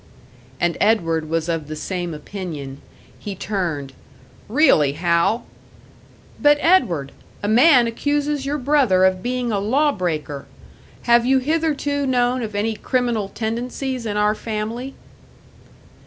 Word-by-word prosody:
And 175 -1 0
Edward 165 -7 +1
was 165 0 -1
of 165 -3 -2
the 155 - -5
same 175 +2 -4
opinion. 150 -5 -7 0.4
He 205 -2 -6
turned. 170 -9 -3 0.6
"Really, 215 - +4
Hal 170 +8 +1 0.5
" - - -25
"But, 295 0 +5
Edward! 180 - +2 0.3
A - - 0
man 250 +3 +6
accuses 290 +4 -1
your 285 +2 -2
brother 255 -9 +3
of 185 -1 +1
being 245 0 -2
a 205 - 0
law 275 +9 +2
breaker! 155 - -4 0.6
Have 235 0 +4
you 265 +1 +4
hitherto 290 0 0
known 250 0 +1
of 215 -3 -5
any 215 +2 0
criminal 235 -3 -1
tendencies 240 +3 -4
in 205 -1 -2
our 210 0 +3
family?" 225 +4 -5
220 Hz, 130 wpm, -21 LUFS, 175-260 Hz, 0.6 s, man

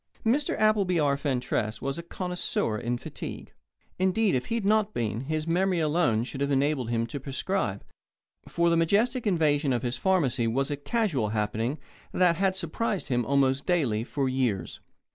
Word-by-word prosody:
Mr. 265 +6 +1
Appleby 205 -5 +3
R. 145 -2 +2
Fentress 125 -6 -1
was 135 +4 -3
a - - -3
connoisseur 180 - -2
in 120 +3 -2
fatigue. - - -8 0.5
Indeed, 190 +2 +2
if 125 -1 -1
he 230 - -1
had 225 -4 -2
not 215 0 +2
been, 115 +2 -2
his 155 +1 -2
memory 180 +2 +1
alone 150 -8 +2
should 135 +2 -6
have 140 - +1
enabled 140 -3 +1
him 115 -1 0
to 115 +5 -6
prescribe, 135 - -2 0.6
for 170 0 +1
the 170 - +3
majestic 220 +9 +2
invasion 150 -6 +2
of 125 0 0
his 120 0 -2
pharmacy 150 -11 +1
was 135 +5 0
a - - 0
casual 145 - 0
happening 110 +5 -1 0.4
that 175 -3 +3
had 190 0 +1
surprised 190 +2 -2
him 120 -2 +1
almost 140 0 +2
daily 130 -12 +1
for 135 +2 -2
years. 125 -9 -1
145 Hz, 170 wpm, -27 LUFS, 125-185 Hz, 0.6 s, Appleby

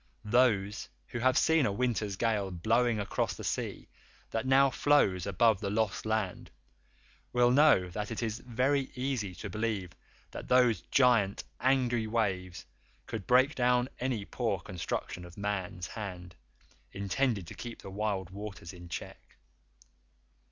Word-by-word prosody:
Those 105 -3 +2 0.2
who 120 - -4
have 130 +3 +3
seen 160 -4 +4
a - - 0
winter 110 -1 0
gale 100 -1 0
blowing 110 +6 +1
across 100 - -1
the - - -9
sea - - -3 0.4
that 115 +3 -2
now 135 +1 +5
flows 100 -13 +2
above 100 +2 +3
the 100 - -3
Lost 110 0 -1
Land 110 -4 -2 0.8
will 120 0 +4
know 140 -9 +5
that 105 +3 -4
it 115 +1 -3
is 110 0 -2
very 130 +3 0
easy 125 -8 -2
to 85 - -6
believe 105 -5 -2 0.4
that - - -8
those 125 -3 +4
giant 115 -7 +3 0.2
angry 125 -4 +2
waves 95 -5 -2 0.4
could 110 -4 -6
break 130 +3 +5
down 125 -1 +2
any 125 -5 -2
poor - - -1
construction 90 0 -4
of 85 -1 -12
man's 95 -4 -3
hand 90 -4 -7 0.6
intended 100 +1 -1
to - - -9
keep 120 -1 -8
the 95 - -8
wild 100 -3 -2
waters 100 -4 -8
in 90 -1 -11
check. - - -8
110 Hz, 145 wpm, -30 LUFS, 95-125 Hz, 0.8 s, now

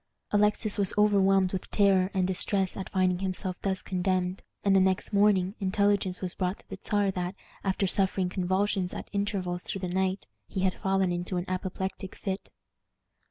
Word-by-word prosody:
Alexis 210 0 +2
was 195 -2 +1
overwhelmed 195 -2 +4
with 190 - -4
terror 195 -2 +3
and 185 -1 +2
distress 190 +1 +1
at 190 - -5
finding 185 -2 +1
himself 185 -1 -2
thus 190 -1 -1
condemned; 185 0 -1 0.2
and 195 -1 +4
the - - +6
next 190 +2 +1
morning 200 -2 +3
intelligence 200 -1 +1
was 185 -1 -3
brought 185 +1 -1
to - - -22
the - - -7
Czar 205 -2 +1
that, 180 0 -3 0.3
after 195 0 0
suffering 190 0 +1
convulsions 185 0 0
at - - -7
intervals 195 -3 -1
through 195 - -5
the 185 - -2
night, 190 +2 -1 0.2
he 190 - -3
had 190 -1 +2
fallen 190 -1 +2
into 175 +1 -2
an 175 - -2
apoplectic 190 +1 -4
fit. 195 -1 -4
190 Hz, 170 wpm, -28 LUFS, 185-200 Hz, 0.3 s, the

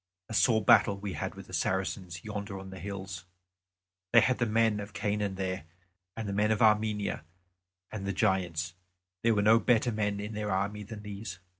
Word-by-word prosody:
A - - -5
sore 110 -1 +3
battle 100 0 +6
we 100 -1 -5
had 75 - -4
with - - -10
the - - -14
Saracens 95 -2 -2
yonder 100 -2 -5
on 95 0 -9
the 95 - -8
hills; 95 -3 -6 0.9
they - - +8
had 130 - +2
the 120 - +2
men 110 -1 +2
of 100 0 -7
Canaan 105 -2 -1
there 95 -2 -3 0.5
and 110 -2 -3
the 100 - -2
men 105 +2 +2
of 110 0 +2
Armenia 105 -5 +2 0.7
and 100 -2 -5
the - - +1
Giants; 90 -5 0 0.5
there 115 -1 +3
were 105 - +2
no 110 +2 +6
better 120 0 +3
men 105 -2 -1
in 105 +2 -5
their 105 0 -3
army 100 +2 -1
than 105 0 -8
these. 100 -2 -6
105 Hz, 190 wpm, -30 LUFS, 95-110 Hz, 0.9 s, they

